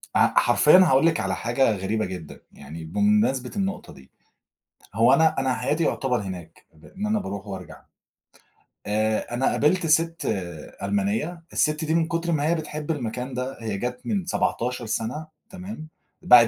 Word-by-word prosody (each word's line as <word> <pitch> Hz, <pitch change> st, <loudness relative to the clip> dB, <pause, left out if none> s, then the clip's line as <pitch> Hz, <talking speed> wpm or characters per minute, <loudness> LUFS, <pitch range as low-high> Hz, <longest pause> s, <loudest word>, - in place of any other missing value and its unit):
أ -, -, +4 dB
حرفيًا 150 Hz, +8 st, +6 dB
هاقول 160 Hz, -5 st, +5 dB
لِك 165 Hz, -, +3 dB
على 95 Hz, -1 st, -1 dB
حاجة 120 Hz, +6 st, +1 dB
غريبة 105 Hz, +3 st, -1 dB
جدًا 85 Hz, -5 st, -8 dB
يعني 75 Hz, +4 st, -10 dB
بمناسبة 170 Hz, -, +1 dB
النقطة 195 Hz, -1 st, -3 dB
دي. 65 Hz, -, -17 dB, 0.8 s
هو 115 Hz, +5 st, +5 dB
أنا 160 Hz, +2 st, +4 dB
أنا 130 Hz, -1 st, +1 dB
حياتي 150 Hz, +5 st, 0 dB
يُعتبر 130 Hz, -6 st, 0 dB
هناك 90 Hz, -4 st, -8 dB
بأن 190 Hz, -, -8 dB
أنا 215 Hz, 0 st, +1 dB
باروح 100 Hz, -, -6 dB
وأرجع. 95 Hz, -3 st, -8 dB, 1.1 s
آآ 110 Hz, +2 st, 0 dB
أنا 125 Hz, +2 st, 0 dB
قابلت 170 Hz, +4 st, +2 dB
ست 165 Hz, +2 st, +2 dB, 0.6 s
ألمانية، 105 Hz, -, -1 dB
الست 150 Hz, +1 st, +1 dB
دي 160 Hz, +1 st, +1 dB
من 165 Hz, -1 st, +2 dB
كتر 170 Hz, +1 st, -1 dB
ما 150 Hz, -1 st, +1 dB
هي 170 Hz, -, +3 dB
بتحب 155 Hz, -1 st, -4 dB
المكان 125 Hz, -2 st, -4 dB
ده، 125 Hz, +2 st, -4 dB
هي 110 Hz, -3 st, -3 dB
جت 125 Hz, +3 st, -3 dB
من 200 Hz, -5 st, -1 dB
17 125 Hz, -9 st, -1 dB
سنة، 115 Hz, +8 st, -3 dB, 0.2 s
تمام؟ 185 Hz, -3 st, -8 dB, 0.3 s
باعت 125 Hz, -10 st, +8 dB
130 Hz, 155 wpm, -24 LUFS, 110-165 Hz, 1.1 s, باعت